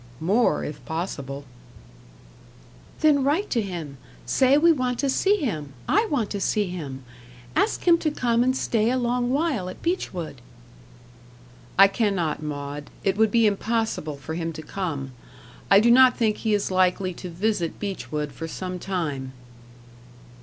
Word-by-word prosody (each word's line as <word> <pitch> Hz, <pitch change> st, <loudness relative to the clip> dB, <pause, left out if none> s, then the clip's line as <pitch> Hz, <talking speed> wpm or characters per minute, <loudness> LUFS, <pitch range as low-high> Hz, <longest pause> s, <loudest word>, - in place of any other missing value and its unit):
"More, 205 Hz, +9 st, +2 dB
if 150 Hz, -, -7 dB
possible." 140 Hz, -5 st, -5 dB, 1.6 s
"Then 295 Hz, -3 st, +4 dB
write 315 Hz, +10 st, 0 dB
to 235 Hz, -, +2 dB
him. 170 Hz, -8 st, -6 dB, 0.3 s
Say, 265 Hz, +1 st, +4 dB
we 335 Hz, +3 st, +6 dB
want 255 Hz, -5 st, 0 dB
to 275 Hz, -, 0 dB
see 400 Hz, +9 st, +3 dB
him 155 Hz, -, -3 dB
I 435 Hz, +2 st, +3 dB
want 240 Hz, -8 st, -1 dB
to 200 Hz, -, -3 dB
see 210 Hz, +2 st, +1 dB
him. 140 Hz, -7 st, -6 dB, 0.5 s
Ask 440 Hz, -, +1 dB
him 340 Hz, -1 st, +6 dB
to 315 Hz, -, 0 dB
come 240 Hz, -5 st, +1 dB
and 260 Hz, +1 st, +1 dB
stay 225 Hz, -3 st, +1 dB
a 255 Hz, -, +1 dB
long 245 Hz, 0 st, 0 dB
while 270 Hz, -, 0 dB
at 185 Hz, -, -11 dB
Beechwood." 185 Hz, -, -3 dB, 1.4 s
"I 195 Hz, +1 st, +9 dB
cannot, 195 Hz, -8 st, -1 dB
Maud. 145 Hz, -1 st, -5 dB
It 195 Hz, -1 st, +1 dB
would 220 Hz, +1 st, +3 dB
be 230 Hz, +1 st, +3 dB
impossible 215 Hz, -6 st, -1 dB
for 150 Hz, +3 st, -7 dB
him 165 Hz, 0 st, -3 dB
to 155 Hz, 0 st, -8 dB
come. 150 Hz, -8 st, -4 dB, 0.6 s
I 195 Hz, -, +8 dB
do 235 Hz, +3 st, +4 dB
not 255 Hz, 0 st, +6 dB
think 220 Hz, -3 st, +1 dB
he 220 Hz, -2 st, +1 dB
is 200 Hz, -1 st, -1 dB
likely 185 Hz, 0 st, +2 dB
to 180 Hz, -, -8 dB
visit 180 Hz, -1 st, -1 dB
Beechwood 150 Hz, -, -4 dB
for 165 Hz, +5 st, -6 dB
some 180 Hz, +2 st, -5 dB
time." 150 Hz, -9 st, -3 dB
195 Hz, 155 wpm, -24 LUFS, 160-245 Hz, 1.6 s, I